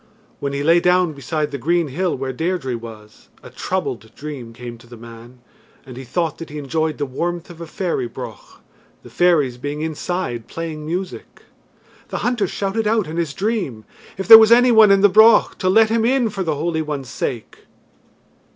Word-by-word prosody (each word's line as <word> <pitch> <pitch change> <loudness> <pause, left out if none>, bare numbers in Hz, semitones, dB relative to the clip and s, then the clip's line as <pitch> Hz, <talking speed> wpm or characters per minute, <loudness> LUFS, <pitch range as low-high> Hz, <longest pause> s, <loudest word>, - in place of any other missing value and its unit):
When 140 - -3
he 140 0 -3
lay 165 +3 +5
down 180 -1 +2
beside 150 +2 -3
the 140 - -5
green 170 +3 0
hill 175 +5 -2
where 130 0 -4
Deirdre 160 -3 -2
was, 110 -2 -12
a - - -12
troubled 125 - -4
dream 140 -6 -8
came 120 0 -9
to 120 - -18
the 120 0 -12
man, 115 +2 -13 0.4
and 130 -1 -11
he 130 - -8
thought 160 +5 -2
that 165 - -8
he 150 - -8
enjoyed 155 +2 -2
the 145 - -2
warmth 170 +6 -4
of 170 -1 -13
a 165 - -7
fairy 155 -8 -3
broch, - - -10 0.5
the - - -14
fairies 150 -9 +2
being 145 +3 -5
inside 160 -6 -4
playing 160 -2 -6
music. 180 +3 -6 0.6
The - - -5
hunter 240 -5 0
shouted 205 +4 -2
out 220 -2 +1
in 160 +2 -7
his 165 -4 -2
dream, 195 - -3 0.3
if 190 -2 -5
there 225 - +12
was 220 0 +5
any 245 +1 +6
one 220 -2 +7
in 195 0 +4
the 205 - +7
broch, 220 +4 +5
to 185 - 0
let 220 +3 +4
him 230 0 +1
in 245 -2 +1
for 195 - -5
the 160 -4 -1
Holy 160 +2 -2
One's 145 -4 -5
sake. 115 +1 -5
160 Hz, 195 wpm, -20 LUFS, 130-185 Hz, 0.6 s, there